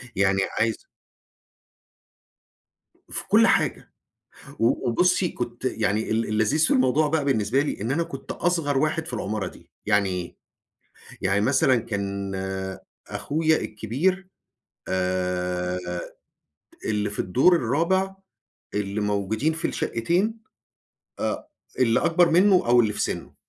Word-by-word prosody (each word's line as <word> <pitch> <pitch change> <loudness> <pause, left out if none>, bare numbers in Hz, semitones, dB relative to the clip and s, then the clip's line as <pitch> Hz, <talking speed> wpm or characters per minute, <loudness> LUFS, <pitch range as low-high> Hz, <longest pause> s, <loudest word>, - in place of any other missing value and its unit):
يعني 95 0 +2 0.2
عايز 115 0 0 2.3
في - - -4
كل - - +6
حاجة. - - +1 0.7
و 115 +1 +1
وبُصّي 180 +7 +3
كنت 120 0 -6
يعني 110 -3 0
ال 115 +1 +1
اللذيذ 110 +9 +2
في - - -2
الموضوع 130 +4 +3
بقى 155 -1 0
بالنسبة 130 -1 +1
لي، 150 - -4
إن 115 - -2
أنا 160 +5 +1
كنت 135 -4 -6
أصغر 165 -6 0
واحد 155 +2 0
في - - -7
العمارة 105 -2 -2
دي. - - -17 0.2
يعني 100 -1 +3
إيه؟ 90 -1 -5 0.9
يعني 95 +1 +2
مثلًا 130 +2 +3
كان 100 -3 -3 0.7
أخويا 160 +2 +1
الكبير 150 - -1 0.6
آآ، 90 -1 -1 1.1
اللي 105 -1 0
في 105 - -8
الدور 130 - +4
الرابع، 170 +9 +1 0.6
اللي 105 0 -2
موجودين 105 +8 0
في 160 - -2
الشقتين، 180 - -1 0.8
آآ، - - -2 0.3
اللي 115 -3 +3
أكبر 170 0 +3
منّه 190 +4 +5
أو 120 0 +6
اللي 110 -2 +1
في 105 - -5
سنه. - - -4
115 Hz, 125 wpm, -24 LUFS, 100-160 Hz, 2.3 s, كل